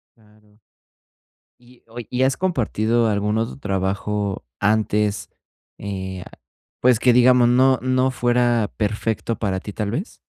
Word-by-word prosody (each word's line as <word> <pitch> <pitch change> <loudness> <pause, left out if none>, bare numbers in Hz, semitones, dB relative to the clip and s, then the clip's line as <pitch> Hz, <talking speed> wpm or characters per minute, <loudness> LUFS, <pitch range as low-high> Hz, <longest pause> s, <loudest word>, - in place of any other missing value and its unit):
Claro. 105 -1 -26 1.0
Y, 125 0 -22
oye, 115 -1 -9
¿y 125 +1 0
has 135 0 +2
compartido 120 - 0
algún 105 0 0
otro 115 +1 -3
trabajo 100 -1 -2 0.2
antes, 105 0 0 0.5
eh, 95 -2 -6 0.6
pues, 125 -3 +4
que 125 0 +4
digamos 125 0 +5
no 130 +2 +4
no 130 0 +1
fuera 120 -3 +1
perfecto 110 +1 -2
para 100 -4 -2
ti, 105 - -7
tal 105 0 -3
vez? 170 - -5
110 Hz, 130 wpm, -21 LUFS, 105-125 Hz, 1.0 s, digamos